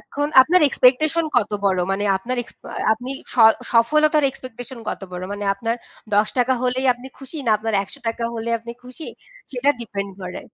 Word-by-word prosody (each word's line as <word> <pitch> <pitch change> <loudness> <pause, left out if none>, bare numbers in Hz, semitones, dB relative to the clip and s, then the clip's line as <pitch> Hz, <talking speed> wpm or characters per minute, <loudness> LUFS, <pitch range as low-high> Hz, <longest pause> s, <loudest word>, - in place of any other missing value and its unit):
এখন 290 +1 -3
আপনার 360 +7 +3
এক্সপেকটেশন 310 +6 +3
কত 210 -4 +2
বড়? 190 -2 +2
মানে 205 +1 -1
আপনার 240 +7 -4
এক্সপা - - -14 0.2
আপনি 245 +4 -5 0.2
স - - -9 0.4
সফলতার 300 +6 +4
এক্সপেকটেশন 255 0 -9
কত - - -4
বড়? 180 0 -5
মানে 205 0 -5
আপনার 230 +3 -2 0.4
৳১০ 245 +5 +2
হলেই 255 +1 0
আপনি 245 +1 -11
খুশি? 270 +4 -9
না - - +3
আপনার 225 0 -2
৳১০০ 230 +3 -4
হলে 230 0 -3
আপনি 235 +1 -8
খুশি? 255 +6 -8 0.4
সেটা 265 +2 +2
ডিপেন্ড 200 -3 -4
করে। 180 0 -6
245 Hz, 165 wpm, -21 LUFS, 220-265 Hz, 0.4 s, সফলতার